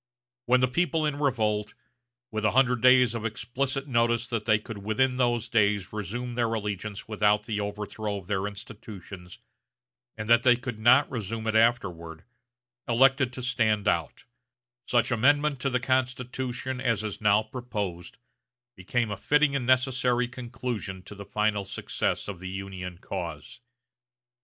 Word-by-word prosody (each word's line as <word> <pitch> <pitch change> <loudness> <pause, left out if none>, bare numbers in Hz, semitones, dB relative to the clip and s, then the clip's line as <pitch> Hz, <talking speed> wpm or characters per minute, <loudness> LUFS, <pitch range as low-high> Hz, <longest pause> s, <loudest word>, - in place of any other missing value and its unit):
When 125 +1 +4
the 130 - +4
people 160 +3 0
in 150 -1 -1
revolt, 110 -7 0 0.6
with 110 -1 -3
a 105 - +4
hundred 125 -3 +3
days 125 -2 +6
of 115 -2 -4
explicit 130 +5 -2
notice 115 -2 +2
that 115 -4 -3
they 110 -1 +4
could 105 0 -8
within 125 +6 +1
those 120 -2 +1
days 105 -4 +1
resume 115 +4 -4
their 120 -1 0
allegiance 105 -2 -4
without 105 -1 +2
the 105 -2 -2
overthrow 105 0 -4
of 95 - -9
their 95 +1 -1
institutions, 100 -4 -10 0.8
and 110 - -5
that 115 +1 +6
they 125 0 +5
could 120 -2 -6
not 125 +6 +6
resume 115 -2 -4
it 110 0 0
afterward, 90 -8 +1 0.6
elected 130 +2 +4
to 125 - -6
stand 110 -4 +1
out, - - -1 0.6
such 120 +1 +2
amendment 145 +4 +3
to 135 - 0
the 125 -1 0
Constitution 125 0 -2
as 115 -4 0
is 105 -1 -5
now 105 0 +4
proposed 105 -7 -5 0.6
became 105 +4 -1
a 100 - -3
fitting 150 +6 +2
and 125 -3 -2
necessary 125 -1 +2
conclusion 120 -6 -5
to 105 - -11
the 100 0 -9
final 105 0 0
success 100 +1 -2
of 100 -4 -6
the 95 +1 -6
Union 95 -2 -6
cause.... 85 -3 -6
115 Hz, 150 wpm, -27 LUFS, 105-125 Hz, 0.8 s, days